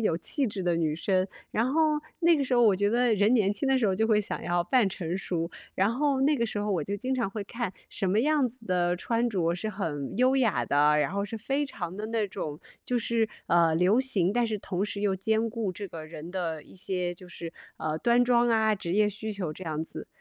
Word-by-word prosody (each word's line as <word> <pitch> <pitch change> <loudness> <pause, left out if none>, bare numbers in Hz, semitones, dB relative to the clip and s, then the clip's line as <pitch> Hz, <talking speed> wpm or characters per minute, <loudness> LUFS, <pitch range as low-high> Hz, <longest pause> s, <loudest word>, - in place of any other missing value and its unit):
有 210 -7 +1
气 270 - 0
质 200 -3 -4
的 175 -1 +1
女 160 -2 0
生。 185 +3 +1 0.2
然 225 +3 +1
后 310 -1 +3 0.2
那 340 -1 +5
个 280 - 0
时 260 - -4
候 245 - +5
我 215 -5 +5
觉 205 +2 +2
得 240 -1 +3
人 205 +3 +3
年 215 -6 +3
轻 205 +7 -2
的 265 0 +3
时 235 - +2
候 190 - +2
就 220 +4 +1
会 215 -2 +4
想 205 - -5
要 175 0 +1
扮 235 +5 +3
成 180 -2 -3
熟。 170 -3 -2 0.2
然 195 +3 +2
后 280 0 +1
那 290 +2 +3
个 235 - +1
时 215 -2 -3
候 205 0 -1
我 175 -6 0
就 200 - -3
经 255 +6 -2
常 245 -5 0
会 210 0 -4
看， 230 -1 -4 0.2
什 195 - -3
么 205 +4 +3
样 295 0 +3
子 235 -1 -10
的 175 -1 +1
穿 230 +6 0
着 170 -5 +1
是 215 +5 -3
很 160 -9 -4
优 255 +2 +4
雅 240 -6 +2
的， 150 +1 +4
然 150 +1 +1
后 200 +1 -1
是 220 +2 -6
非 275 +6 -1
常 180 -9 -6
的 210 - -4
那 220 -2 -1
种 150 -4 -5 0.2
就 250 - 0
是， 230 -1 +1 0.2
呃， 170 -2 +4
流 180 +7 +3
行， 220 -9 +1
但 240 +3 +1
是 215 -2 -2
同 190 -1 -2
时 205 -1 -5
又 200 -2 +1
兼 220 +4 +1
顾 220 -4 -3
这 200 +2 -7
个 160 -2 -8
人 155 +1 -9
的 170 -4 -3
一 - - -17
些 180 -1 -2
就 180 +1 -11
是， 170 -1 -7 0.3
呃， 155 0 -2
端 235 +8 +3
庄 240 -1 +3
啊、 220 -1 +3
职 175 -4 -4
业 210 +2 +4
需 215 +1 -5
求 190 -6 -3
这 185 - -9
样 155 -1 -2
子。 160 - -8
205 Hz, 270 characters per minute, -28 LUFS, 175-235 Hz, 0.3 s, 那